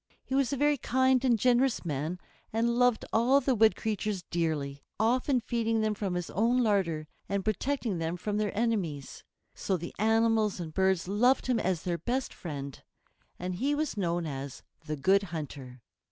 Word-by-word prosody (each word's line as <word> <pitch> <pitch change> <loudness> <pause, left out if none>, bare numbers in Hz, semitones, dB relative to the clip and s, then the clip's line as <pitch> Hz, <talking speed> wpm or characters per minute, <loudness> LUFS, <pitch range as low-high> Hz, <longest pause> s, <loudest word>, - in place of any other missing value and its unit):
He - - -7
was 270 -3 +2
a 280 - -1
very 290 0 +2
kind 260 +1 +2
and 245 -3 +3
generous 250 0 +2
man, 155 +3 -2 0.3
and 230 +2 +1
loved 245 -2 +3
all 250 +5 +4
the 270 -2 +1
wood 220 -1 +4
creatures 210 -3 -2
dearly, 150 -5 -1 0.2
often 250 +4 +2
feeding 230 -1 0
them 215 0 +1
from 200 -3 -3
his 175 -1 -3
own 240 +5 +2
larder, 175 -8 0 0.2
and 200 -1 -1
protecting 220 -2 -1
them 165 +2 -2
from 205 +3 -2
their 210 -1 0
enemies. 190 - -2 0.3
So 190 - -1
the 170 +1 -7
animals 220 -1 +2
and 160 -3 -6
birds 190 -1 +1
loved 245 +7 +3
him 250 -3 +1
as 185 -5 -1
their 170 -2 -2
best 245 - -2
friend, 140 -5 -7 0.6
and 180 0 -4
he 280 +6 +1
was 305 0 -2
known 175 -4 -1
as 135 -2 -6 0.2
the 155 - -2
Good 190 +8 +3
Hunter. 135 -6 -7
210 Hz, 175 wpm, -29 LUFS, 170-240 Hz, 0.6 s, all